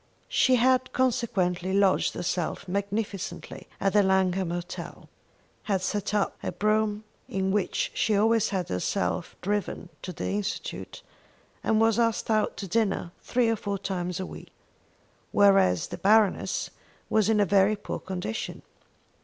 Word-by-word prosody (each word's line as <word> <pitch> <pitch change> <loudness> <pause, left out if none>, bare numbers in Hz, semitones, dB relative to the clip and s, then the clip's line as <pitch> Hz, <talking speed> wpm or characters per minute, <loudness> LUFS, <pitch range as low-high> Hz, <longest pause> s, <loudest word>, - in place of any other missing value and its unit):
She 260 - +4
had 255 +1 +2
consequently 190 -8 0
lodged 195 -1 +3
herself 175 +2 -2
magnificently 200 +1 -4
at 195 0 +1
the 210 - +6
Langham 190 -1 +2
Hotel, 175 0 -6 0.6
had 195 -3 0
set 205 +2 -1
up 205 - +1
her - - -3
brougham, 215 0 +1 0.3
in 190 0 0
which 205 -1 0
she 215 - +1
always 220 +1 +3
had 185 -4 -2
herself 170 - -1
driven 200 -2 -2
to 180 - -5
the 175 - -4
Institute, 205 0 -4 0.6
and 220 - +2
was 225 0 +3
asked 230 -1 +1
out 215 -1 +1
to 195 - -5
dinner 195 -3 0
three 245 -1 +1
or 225 - +2
four 200 -1 -3
times 180 -2 -3
a 185 - -3
week; - - -10 0.8
whereas 195 - +4
the - - -6
Baroness 210 0 +2 0.4
was 215 -1 +2
in 220 -1 +3
a 205 - +4
very 195 +2 +4
poor 205 - -5
condition. 190 +4 -5
200 Hz, 145 wpm, -27 LUFS, 185-215 Hz, 0.8 s, the